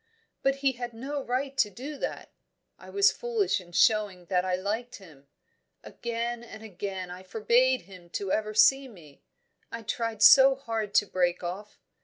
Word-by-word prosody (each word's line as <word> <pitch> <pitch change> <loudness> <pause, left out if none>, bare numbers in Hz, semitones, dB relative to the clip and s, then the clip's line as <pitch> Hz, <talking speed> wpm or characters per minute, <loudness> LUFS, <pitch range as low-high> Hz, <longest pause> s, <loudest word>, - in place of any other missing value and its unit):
But 270 0 +2
he 270 - +5
had 240 -2 -7
no 280 +5 -4
right 265 +3 -2
to 210 - +4
do 265 +9 -8
that - - -5 0.5
I - - -13
was 400 0 +4
foolish 455 - -1
in 175 -1 -17
showing 205 -2 +2
that 180 -1 +2
I 185 -1 0
liked 215 +6 -4
him. 155 -8 -16 0.6
Again 235 0 -4
and 225 -2 -11
again 190 -3 -6
I 180 +1 -9
forbade 235 +6 +2
him 180 -2 -15 0.2
ever 215 0 -1
to 215 - -1
see 270 0 +5
me; 165 - -16 0.5
I 230 0 -7
tried 225 -1 -2
so 270 0 +8
hard 225 -6 -4
to 205 - +5
break 180 -2 -1
off! 195 +4 -6
220 Hz, 170 wpm, -27 LUFS, 185-255 Hz, 0.6 s, so